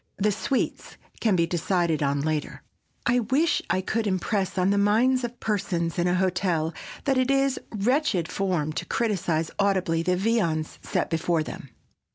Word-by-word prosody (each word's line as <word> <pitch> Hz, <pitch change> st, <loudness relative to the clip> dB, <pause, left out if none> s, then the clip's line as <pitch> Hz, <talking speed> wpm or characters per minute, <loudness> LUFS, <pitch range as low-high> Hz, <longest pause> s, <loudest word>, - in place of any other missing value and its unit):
The 210 Hz, +2 st, +2 dB
sweets 245 Hz, +6 st, -2 dB, 0.2 s
can 215 Hz, -4 st, +2 dB
be 170 Hz, -1 st, +3 dB
decided 170 Hz, -2 st, 0 dB
on 140 Hz, 0 st, +1 dB
later. 155 Hz, 0 st, -2 dB, 0.4 s
I 245 Hz, +1 st, +3 dB
wish 270 Hz, +8 st, +2 dB
I 185 Hz, -, +1 dB
could 220 Hz, +3 st, -1 dB
impress 190 Hz, 0 st, -1 dB
on 185 Hz, +1 st, +3 dB
the 200 Hz, -, +2 dB
minds 240 Hz, +6 st, +3 dB
of 240 Hz, 0 st, -5 dB
persons 180 Hz, -5 st, -1 dB
in 175 Hz, -, +2 dB
a 180 Hz, -, +2 dB
hotel 180 Hz, -3 st, 0 dB, 0.3 s
that 270 Hz, -2 st, +2 dB
it 255 Hz, 0 st, +1 dB
is 275 Hz, -1 st, +2 dB
wretched 225 Hz, -, +1 dB
form 175 Hz, -6 st, -1 dB
to -, -, -3 dB
criticize 180 Hz, -8 st, 0 dB
audibly 190 Hz, -4 st, +2 dB
the 180 Hz, +1 st, +1 dB
viands 180 Hz, -7 st, 0 dB
set -, -, -2 dB
before 165 Hz, 0 st, +1 dB
them. 140 Hz, -, -8 dB
190 Hz, 165 wpm, -26 LUFS, 170-225 Hz, 0.4 s, be